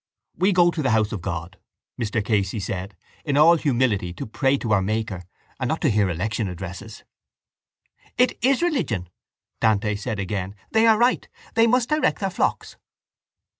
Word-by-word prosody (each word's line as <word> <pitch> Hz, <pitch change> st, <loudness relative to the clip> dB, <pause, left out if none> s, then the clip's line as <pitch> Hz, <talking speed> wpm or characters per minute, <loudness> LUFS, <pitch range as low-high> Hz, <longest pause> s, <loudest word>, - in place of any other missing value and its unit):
—We 190 Hz, +4 st, +2 dB
go 175 Hz, -2 st, +4 dB
to 165 Hz, -, -3 dB
the 135 Hz, -, +1 dB
house 110 Hz, -2 st, +2 dB
of 105 Hz, -, -4 dB
God, 85 Hz, +1 st, -5 dB, 0.4 s
Mr 110 Hz, -2 st, -1 dB
Casey 105 Hz, -1 st, 0 dB
said, 95 Hz, 0 st, -5 dB, 0.3 s
in 145 Hz, -2 st, 0 dB
all 165 Hz, +3 st, +7 dB
humility 120 Hz, -, 0 dB
to -, -, -6 dB
pray 135 Hz, +5 st, +1 dB
to 115 Hz, -4 st, -4 dB
our 100 Hz, -, +3 dB
Maker 110 Hz, -2 st, -2 dB, 0.4 s
and 130 Hz, -, -1 dB
not 160 Hz, -, -1 dB
to 150 Hz, -, +2 dB
hear 105 Hz, -2 st, +2 dB
election 105 Hz, +5 st, -2 dB
addresses. 95 Hz, +4 st, -8 dB, 1.1 s
—It 250 Hz, +1 st, +3 dB
is 270 Hz, +5 st, +3 dB
religion, 130 Hz, -, -1 dB, 0.5 s
Dante 105 Hz, -1 st, +2 dB
said 110 Hz, +2 st, -4 dB
again. 100 Hz, 0 st, -3 dB, 0.2 s
They 225 Hz, +1 st, +4 dB
are 220 Hz, -1 st, +6 dB
right. 245 Hz, +3 st, +2 dB, 0.3 s
They 230 Hz, 0 st, +4 dB
must 245 Hz, +1 st, +2 dB
direct 305 Hz, 0 st, +1 dB
their 195 Hz, -1 st, -2 dB
flocks. -, -, -2 dB
110 Hz, 170 wpm, -23 LUFS, -, 1.1 s, all